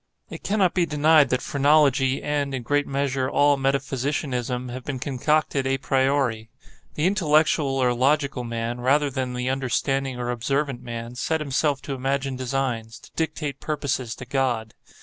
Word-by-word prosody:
It - - -7
cannot 195 -3 +1
be 175 -2 +1
denied 150 -1 +4
that 125 -1 0
phrenology 140 -2 +3
and, 145 -2 -1
in 125 - -5
great 145 +4 +1
measure, 135 -1 -1
all 145 +1 +4
metaphysicianism 135 -2 -1
have 125 +1 -6
been 140 0 -4
concocted 140 +1 0
a 135 0 +1
priori. 130 -4 0 0.5
The 150 - 0
intellectual 155 -6 +2
or 125 -2 +2
logical 135 +1 +1
man, 115 +1 -3
rather 140 +3 +2
than 130 -1 -3
the 125 +1 -2
understanding 135 0 -1
or 120 0 -2
observant 135 +2 -1
man, 115 -1 -6
set 160 +6 -1
himself 145 -1 0
to 140 - -4
imagine 135 +1 -1
designs—to 125 -3 -3
dictate 155 -3 -3
purposes 135 -6 -2
to 125 - -9
God. 125 -4 -1
135 Hz, 150 wpm, -24 LUFS, 125-145 Hz, 0.5 s, denied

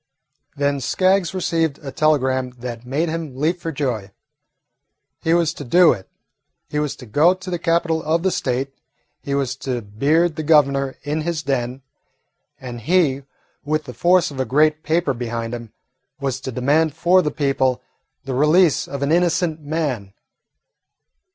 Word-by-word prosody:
Then 140 0 0
Skaggs 185 +6 +2
received 165 -5 0
a 135 - -5
telegram 130 -4 +1
that 120 -1 -7
made 150 +6 0
him 160 -5 -4
leap 160 +6 0
for 165 - -4
joy. 125 -9 -2 1.1
He 165 +1 +2
was 170 -2 +2
to 145 - -8
do 170 +7 +5
it. 95 -5 -10 0.6
He 150 - 0
was 150 -2 -2
to 125 - -12
go 150 - +3
to 185 0 -9
the 175 - -2
capital 165 -1 +1
of 160 +2 0
the 190 - +2
State. 135 -5 -2 0.5
He 140 - -2
was 135 -2 -1
to 125 -4 -3
beard 150 +11 +1
the - - -1
Governor 140 -3 +3
in 150 +2 -2
his 160 -1 -2
den, 130 -1 -2 0.8
and 120 -2 -7
he, 140 -2 +2 0.4
with 155 +1 -1
the 125 - -9
force 175 +6 +3
of 135 - -8
a - - +2
great 150 +5 +2
paper 160 -2 +1
behind 115 -1 -4
him, 120 -2 -7 0.5
was 135 -2 -2
to 130 - -5
demand 145 +5 +1
for 175 +3 +4
the 150 - -1
people 135 -4 0 0.5
the 135 - -3
release 155 +4 +3
of 140 0 -4
an 140 - 0
innocent 170 -1 +1
man. 145 -10 -3
145 Hz, 165 wpm, -21 LUFS, 130-165 Hz, 1.1 s, do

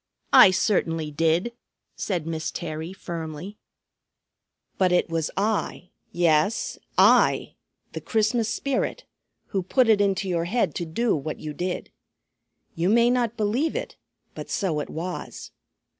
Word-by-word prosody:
"I - - +10
certainly 165 -5 0
did," 165 +9 +1 0.4
said 175 -6 -2
Miss 160 -1 -3
Terry 160 +1 -5
firmly. 170 +1 -7 1.2
"But 185 -2 +3
it 180 -1 +2
was 165 -2 -1
I, 200 -3 -1 0.2
yes 170 +4 +1 0.2
I, - - +4 0.4
the - - -6
Christmas 225 0 0
Spirit, 275 - -2 0.5
who 195 - -1
put 245 +7 +2
it 215 -2 +4
into 195 -1 +1
your 170 -2 0
head 230 +7 0
to 175 - -3
do 230 +8 0
what 155 +1 -5
you 155 -1 -6
did. 180 +3 -4 0.8
You 170 +3 0
may 235 +2 +4
not 240 -2 0
believe 235 +9 0
it, - - -4 0.4
but - - -8
so 185 -9 -1
it 145 - -5
was. 175 +3 -6
185 Hz, 135 wpm, -25 LUFS, 165-220 Hz, 1.2 s, I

